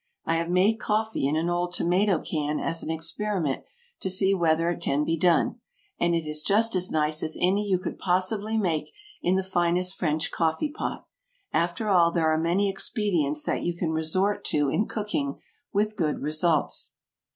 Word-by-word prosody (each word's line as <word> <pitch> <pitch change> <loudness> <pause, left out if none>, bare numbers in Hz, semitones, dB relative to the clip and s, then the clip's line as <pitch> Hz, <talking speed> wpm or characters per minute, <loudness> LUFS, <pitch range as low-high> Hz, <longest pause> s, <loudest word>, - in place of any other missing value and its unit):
I 165 - +1
have 165 +1 -2
made 195 +5 +3
coffee 220 - 0
in 145 - 0
an 160 +2 0
old 175 0 -1
tomato 185 +2 +2
can 150 -1 -2
as 165 0 -1
an - - -5
experiment, 165 -1 -2 0.4
to 190 - -2
see 190 +1 +4
whether 165 -2 +2
it 175 - -5
can 140 +2 0
be 165 - 0
done, 170 +1 +2 0.4
and 170 0 +2
it 165 -1 -1
is 150 0 -1
just 220 +7 +3
as 185 0 +1
nice 155 0 +2
as 155 - -2
any 195 +3 +2
you 185 - +3
could 180 - -6
possibly 200 +4 0
make 170 -7 0 0.3
in 180 - +2
the 190 - +1
finest 180 0 0
French 160 -3 -1
coffee 165 - 0
pot. 310 - -5 0.5
After 175 +6 0
all 175 -4 +5
there 165 -2 +2
are 155 - +2
many 175 +5 +1
expedients 180 - 0
that - - -1
you 175 0 -2
can 170 -2 -1
resort 175 +6 0
to 145 -2 +1
in 210 +9 0
cooking 205 -10 -3 0.3
with 210 +1 0
good 160 -7 -1
results. 155 +1 0
175 Hz, 185 wpm, -26 LUFS, 160-195 Hz, 0.5 s, all